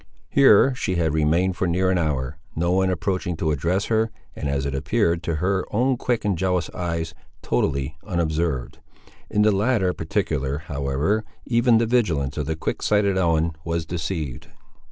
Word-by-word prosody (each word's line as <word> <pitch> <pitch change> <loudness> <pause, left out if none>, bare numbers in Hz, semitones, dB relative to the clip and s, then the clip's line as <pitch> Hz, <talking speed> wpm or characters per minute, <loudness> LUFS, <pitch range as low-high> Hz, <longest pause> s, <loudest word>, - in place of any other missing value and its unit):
Here 135 -1 +6
she 100 -7 -2
had 80 -3 +1
remained 80 +4 +2
for 95 - 0
near 95 +2 +2
an 90 - +2
hour, 75 -2 -2 0.2
no 85 +2 0
one 95 +1 +2
approaching 90 -1 -1
to 80 -1 0
address 85 +7 0
her, 110 0 +1 0.3
and 70 - -3
as 70 -1 -1
it 70 - -2
appeared 85 +5 +1
to 85 -2 -2
her 95 +4 0
own 125 +5 +2
quick 120 -2 -1
and 100 -2 +2
jealous 90 -1 0
eyes, 85 -2 -3 0.3
totally 70 +3 0
unobserved. 80 - -1 0.5
In 105 0 +2
the 105 - +5
latter 100 -2 +1
particular, 80 -6 -1
however, 75 +6 -1 0.2
even 120 -1 +4
the 115 - +2
vigilance 85 - +1
of 75 -2 -3
the 80 - -1
quick 80 - -3
sighted 105 -2 +2
Ellen 85 -3 +1
was 85 -1 -2
deceived. 80 -6 -4
85 Hz, 170 wpm, -23 LUFS, 80-100 Hz, 0.5 s, Here